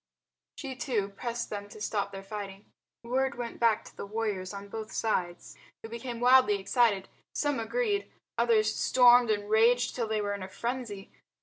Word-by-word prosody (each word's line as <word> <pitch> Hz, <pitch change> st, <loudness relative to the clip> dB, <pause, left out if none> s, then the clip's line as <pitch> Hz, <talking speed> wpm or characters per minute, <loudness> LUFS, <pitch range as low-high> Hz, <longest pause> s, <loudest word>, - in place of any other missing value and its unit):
She, 270 Hz, -3 st, -5 dB
too, 235 Hz, -6 st, -1 dB
pressed 235 Hz, +3 st, -4 dB
them 205 Hz, -1 st, -5 dB
to 215 Hz, -, -12 dB
stop 205 Hz, -1 st, -2 dB
their 195 Hz, 0 st, -8 dB
fighting. 200 Hz, 0 st, -7 dB, 0.4 s
Word 265 Hz, +3 st, 0 dB
went 240 Hz, -1 st, -6 dB
back 230 Hz, -2 st, +3 dB
to -, -, -14 dB
the -, -, -7 dB
warriors 205 Hz, -4 st, -2 dB
on 200 Hz, 0 st, -8 dB
both 220 Hz, +1 st, -6 dB
sides, 175 Hz, -6 st, -2 dB, 0.3 s
who 225 Hz, -, -7 dB
became 235 Hz, +1 st, -6 dB
wildly 250 Hz, -4 st, +5 dB
excited. 200 Hz, -1 st, +2 dB, 0.3 s
Some 290 Hz, -4 st, 0 dB
agreed, 410 Hz, -, -1 dB, 0.2 s
others 220 Hz, -2 st, +3 dB
stormed 245 Hz, -1 st, +6 dB
and 205 Hz, -1 st, 0 dB
raged 235 Hz, +3 st, +4 dB
till 235 Hz, -3 st, -1 dB
they 215 Hz, 0 st, 0 dB
were 205 Hz, -1 st, -1 dB
in 200 Hz, -, -5 dB
a 185 Hz, -, -6 dB
frenzy. 235 Hz, -3 st, -5 dB
225 Hz, 175 wpm, -29 LUFS, 205-245 Hz, 0.4 s, stormed